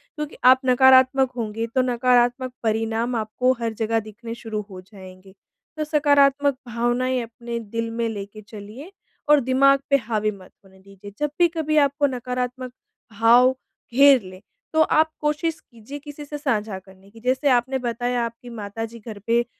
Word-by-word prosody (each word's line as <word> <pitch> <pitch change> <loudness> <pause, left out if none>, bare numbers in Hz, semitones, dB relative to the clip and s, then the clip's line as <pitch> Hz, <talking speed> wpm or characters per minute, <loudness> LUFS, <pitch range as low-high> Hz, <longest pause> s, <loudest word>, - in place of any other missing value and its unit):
क्योंकि 300 -1 -6
आप 255 +1 +7
नकारात्मक 260 +1 +5
होंगे 225 0 -3
तो 260 - +4
नकारात्मक 250 0 +1
परिणाम 225 +2 -1
आपको 230 +3 0
हर 230 -1 -2
जगह 225 +1 -1
दिखने 230 +2 -8
शुरू 220 -2 -5
हो 185 -2 -10
जाएँगे। 190 -1 -15 0.4
तो 310 - -1
सकारात्मक 285 -2 +3
भावनाएँ 240 +2 0
अपने 235 0 -6
दिल 230 +1 -4
में 230 - +1
लेके 205 0 -8
चलिए 215 - -11 0.4
और 300 -1 +7
दिमाग 275 +2 +3
पे 280 - +4
हावी 215 -3 -2
मत 190 -3 -14
होने 190 0 -20
दीजिए। 195 +1 -14
जब 295 -1 -1
भी 350 - +6
कभी 315 -2 -2
आपको 285 0 +3
नकारात्मक 250 0 -4 0.5
भाव 240 +3 +6 0.4
घेर 275 0 +6
लें, 185 -1 -12 0.3
तो 315 - +4
आप 315 0 +3
कोशिश 305 +2 -1
कीजिए 235 +4 -11
किसी 290 0 -10
से 295 +1 -6
साझा 220 -9 -2
करने 190 +1 -19
की। 225 +3 -16
जैसे 255 +4 0
आपने 255 +1 +2
बताया 245 0 -2
आपकी 235 +1 -9
माताजी 225 +1 -7
घर 215 -1 -9
पे 235 +1 +2
240 Hz, 160 wpm, -22 LUFS, 220-270 Hz, 0.5 s, आप